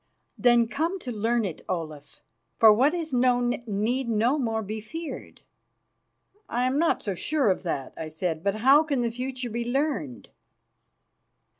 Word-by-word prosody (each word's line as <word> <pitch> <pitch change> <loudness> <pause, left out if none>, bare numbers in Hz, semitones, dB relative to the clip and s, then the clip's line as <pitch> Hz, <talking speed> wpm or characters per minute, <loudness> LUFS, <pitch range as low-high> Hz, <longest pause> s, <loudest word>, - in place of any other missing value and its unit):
"Then 240 -1 +4
come 325 +10 -1
to 250 - -5
learn 225 +1 0
it, 175 -5 -5
Olaf, 155 -5 -6 0.3
for 220 -2 +8
what 270 +9 +3
is 325 -4 -4
known 245 -1 +2 0.2
need 230 +5 -1
no 230 +6 +2
more 225 -3 -1
be 215 +2 -5
feared." 325 +9 -8 1.1
"I 245 +1 0
am 260 +3 +1
not 335 - +1
so 200 - -2
sure 270 - +1
of 185 - -2
that," 145 -7 -4
I 160 - -5
said. 160 +1 -3
"But 200 0 0
how 265 +7 +5
can 290 -5 -1
the 235 -1 0
future 250 0 -5
be 235 +2 -2
learned?" 235 - -2
235 Hz, 160 wpm, -26 LUFS, 200-265 Hz, 1.1 s, for